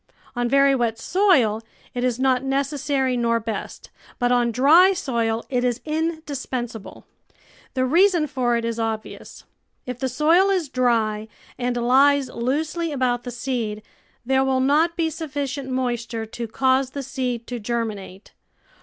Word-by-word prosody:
On 245 0 0
very 275 +1 +4
wet 235 -4 0
soil 255 - +2 0.3
it 245 - -3
is 250 -1 0
not 260 -1 +2
necessary 270 -1 0
nor 230 -1 +1
best, 225 -1 -6 0.3
but 245 -1 +1
on 240 -1 +2
dry 315 - +6
soil 235 -9 -1
it 250 -2 -1
is 245 -1 0
indispensable. 290 -8 -4 0.7
The 255 0 +1
reason 345 +3 +4
for 255 -4 0
it 230 - -3
is 230 0 -3
obvious. 220 -1 -5 0.4
If 250 -1 -6
the 265 - -1
soil 325 +9 +3
is 365 -7 0
dry 225 -4 0 0.3
and 245 0 -2
lies 270 +3 +4
loosely 305 +7 -2
about 250 -3 -1
the - - -4
seed, 235 -3 -3 0.4
there 265 +1 +2
will 265 -1 +1
not 305 +6 +2
be 325 -1 0
sufficient 280 -3 -4
moisture 240 -3 -2
to 230 +1 -6
cause 260 +3 +1
the 280 +1 -6
seed 255 -3 -3
to 245 0 -5
germinate. 210 -4 -5
255 Hz, 145 wpm, -23 LUFS, 235-280 Hz, 0.7 s, dry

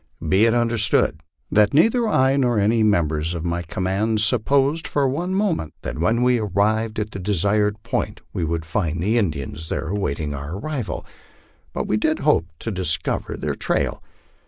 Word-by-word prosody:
Be 100 +4 +4
it 115 0 +3
understood 115 -9 +2 0.3
that 105 +3 +3
neither 225 - +4
I 130 -9 +3
nor 125 -4 +2
any 110 +3 +2
members 85 -6 +1
of 85 0 -4
my 85 0 -1
command 95 +6 -1
supposed 135 +8 +2
for 140 -2 +1
one 175 +8 -2
moment 185 - -1
that - - -5
when 115 +8 +2
we 125 -1 +3
arrived 110 +2 0
at 105 0 -2
the 100 - -6
desired 105 +2 0
point 115 -3 -2
we 90 - -2
would 80 0 -2
find 85 -1 -2
the 110 +7 +2
Indians 80 - -3
there - - -3
awaiting 75 -7 -2
our 70 +6 -5
arrival, 135 0 -4 0.7
but - - -3
we 105 - 0
did 155 +8 0
hope 140 - +2
to 115 - -3
discover 90 -5 -2
their - - -2
trail. - - -1
105 Hz, 170 wpm, -22 LUFS, 85-120 Hz, 0.7 s, Be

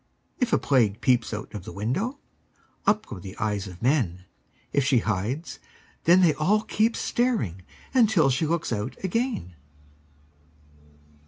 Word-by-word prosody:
If 250 -2 +1
a - - +5
Plague 115 -6 +2
peeps 125 -2 +2
out 105 0 -6
of 105 -4 -6
the - - -8
window, 150 - -2 0.7
Up 210 +2 +3
go 105 - -8
the 95 +3 -9
eyes 105 -2 -1
of 90 +2 -11
men; 110 - +1 0.5
If 140 - +3
she 135 -1 +3
hides, 110 - -2 0.5
then 175 +3 +6
they 170 -4 +5
all 200 +9 +2
keep 225 +2 +1
staring 225 - 0 0.3
Until 215 - +4
she 135 +5 0
looks 165 -5 -1
out 105 +3 -3
again. 225 - -1
135 Hz, 145 wpm, -26 LUFS, -, 0.7 s, then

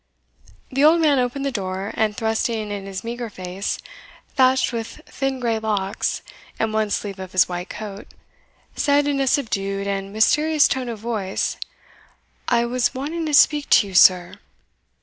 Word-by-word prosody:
The 270 +2 +1
old 320 +3 +6
man 295 -4 +3
opened 250 +3 -2
the 275 - 0
door, 190 -2 -4
and 215 -1 0
thrusting 220 -2 -1
in 200 -1 -5
his 190 -1 -6
meagre 235 0 -5
face, 185 0 -4 0.5
thatched 260 -2 +2
with 230 +4 -5
thin 270 -1 -3
grey 230 -3 0
locks, 205 -3 -2 0.3
and 220 -1 -1
one 215 -1 0
sleeve 200 -1 -3
of 185 -1 -8
his 185 - +4
white 175 0 -5
coat, 205 -2 -8 0.7
said 285 -1 +2
in 285 -1 0
a 270 - +1
subdued 200 -7 -1
and 195 0 -3
mysterious 300 +8 +3
tone 255 -2 -2
of 230 - -5
voice, 210 -3 -2 0.9
"I 235 -1 +2
was 245 +1 0
wanting 315 +5 -3
to 300 - -3
speak 295 0 +4
to 205 - +5
you, - - -10
sir." 180 -1 +5
225 Hz, 165 wpm, -22 LUFS, 195-265 Hz, 0.9 s, old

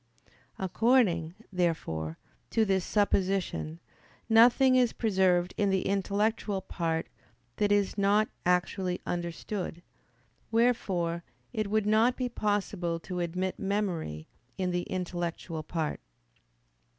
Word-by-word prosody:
According, 190 -5 +2 0.2
therefore, 80 - -1 0.3
to 225 - +2
this 190 -2 +1
supposition, 190 -5 0 0.5
nothing 240 +3 +6
is 250 -2 +3
preserved 185 -5 +2
in 205 -1 +2
the 190 -1 +1
intellectual 200 +1 0
part 165 -3 -2 0.5
that 205 -1 +2
is 205 0 +2
not 205 +2 +3 0.2
actually 180 +1 +1
understood: 175 +1 -4 0.7
wherefore 190 -8 +1 0.3
it 215 -3 -1
would 215 0 +1
not 220 +4 +3
be 255 -1 -1
possible 200 -6 -1
to 180 0 -5
admit 180 +2 -2
memory 190 - -2 0.3
in 185 -1 0
the 175 0 -2
intellectual 175 -3 -3
part. 155 0 -3
190 Hz, 105 wpm, -29 LUFS, 175-210 Hz, 0.7 s, nothing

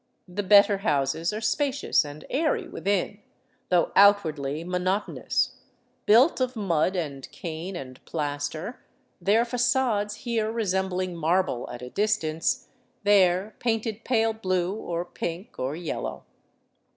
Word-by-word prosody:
The 180 +3 -3
better 200 0 +6
houses 155 -2 0
are 215 +1 -4
spacious 280 +3 +1
and 150 +1 -9
airy 305 +2 0
within, 200 +1 -1 0.5
though 175 -2 +3
outwardly 160 -7 +4
mo 180 +1 -2
notonous, 185 +3 -1 0.5
built 250 +7 +5
of 255 0 0
mud 185 -4 +1
and 140 -6 -4
cane 170 +3 -6
and 130 -5 -8
plaster, 150 - -4 0.4
their 220 +4 +3
fagades 245 -4 +1
here 225 -3 0
re 230 0 -1
sembling 185 -1 -1
marble 165 -5 0
at 120 0 -8
a 125 - -8
distance, 210 +3 0 0.3
there 195 0 +3
painted 225 -2 -1
pale 225 -2 +2
blue, 185 -4 -1
or 175 -5 -4
pink, 175 +3 -6
or 130 +3 -2
yellow. 170 -2 -4
190 Hz, 125 wpm, -26 LUFS, 165-220 Hz, 0.5 s, better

